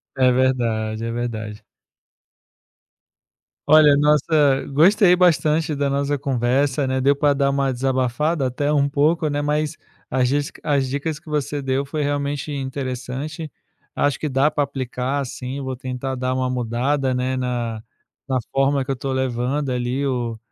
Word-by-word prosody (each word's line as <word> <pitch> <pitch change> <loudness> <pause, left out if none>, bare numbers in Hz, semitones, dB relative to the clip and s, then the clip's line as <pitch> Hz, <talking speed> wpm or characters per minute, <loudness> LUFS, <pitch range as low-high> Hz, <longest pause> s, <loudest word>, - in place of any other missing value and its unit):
É 130 -2 +4
verdade. 115 -4 0
É 115 - -3
verdade. 110 -3 -4 2.0
Olha, 150 -1 +7
nossa 150 -1 +3
gostei 185 +4 +5
bastante 160 -3 +2
da 140 0 0
nossa 140 +1 0
conversa, 135 +1 0
né. 130 0 0
Deu 140 +2 +3
pra 145 0 +3
dar 140 0 +1
uma 140 -1 +1
desabafada, 130 +3 0
até, 145 +3 -2
um 140 -1 +2
pouco, 155 +2 +2
né. 145 0 -1
Mas 150 +1 -1 0.3
as 125 -1 +2
disca 145 +2 -2
as 140 -2 +2
dicas 145 +3 -2
que 155 - -15
você 145 -1 -2
deu 135 +1 -1
foi 150 +2 -3
realmente 145 0 -2
interessante. 135 +3 -4 0.5
Acho 145 -1 +1
que 155 - -2
dá 140 +2 +2
pra 145 - +1
aplicar, 135 0 -3
sim. 130 +2 -6
Vou 130 -1 -4
tentar 130 +1 -4
dar 130 0 -1
uma 130 0 -1
mudada, 130 +3 0
né, 130 +1 -1
na 120 -3 -2 0.5
na 130 -2 +1 0.2
forma 135 0 +2
que - - -2
eu - - -1
tô 135 +2 -3
levando, 130 +2 -1
ali, 125 +2 -1
o 120 -4 -2
135 Hz, 155 wpm, -21 LUFS, 130-145 Hz, 2.0 s, Olha